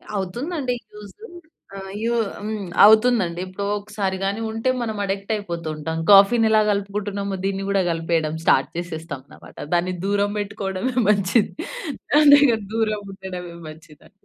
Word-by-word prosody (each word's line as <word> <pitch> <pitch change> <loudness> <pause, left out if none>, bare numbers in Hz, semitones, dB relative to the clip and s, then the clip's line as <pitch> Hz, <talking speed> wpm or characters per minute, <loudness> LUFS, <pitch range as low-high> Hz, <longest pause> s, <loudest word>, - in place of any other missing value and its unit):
అవుతుందండి 250 - -3 0.2
యూజు. 210 - -12 0.5
ఆహ్, 195 0 -8
యూ 235 +1 +1 0.3
హ్మ్, 215 0 -4 0.2
అవుతుందండి. 215 -5 +4
ఎప్పుడో 185 +2 -5
ఒకసారి 200 -2 -3
గాని 200 +3 -2
ఉంటే 225 +3 -1
మనం 220 -2 -3
అడిక్ట్ 195 +2 -3
అయిపోతూ 170 -6 -5
ఉంటాం. 160 +2 -4
కాఫీ‌ని 205 +3 +6
ఎలా 215 0 +5
కలుపుకుంటున్నామో 200 -1 -3
దీన్ని 195 0 -2
కూడా 200 -1 +2
కలిపేయడం 165 -1 -1
స్టార్ట్ - - +3
చేసేస్తాం 165 -4 -5
అన్నమాట. - - -16 0.2
దాన్ని 175 +1 +1
దూరం 205 0 +1
పెట్టుకోవడమే 200 +4 -3
మంచిది. 200 +1 +2 0.7
అదే 285 -1 +8
కదా 220 -3 -2
దూరం 215 -2 0
ఉండడమే 185 -3 -8
మంచిది 155 -1 -13
అండి. - - -26
200 Hz, 140 wpm, -22 LUFS, 185-215 Hz, 0.7 s, అదే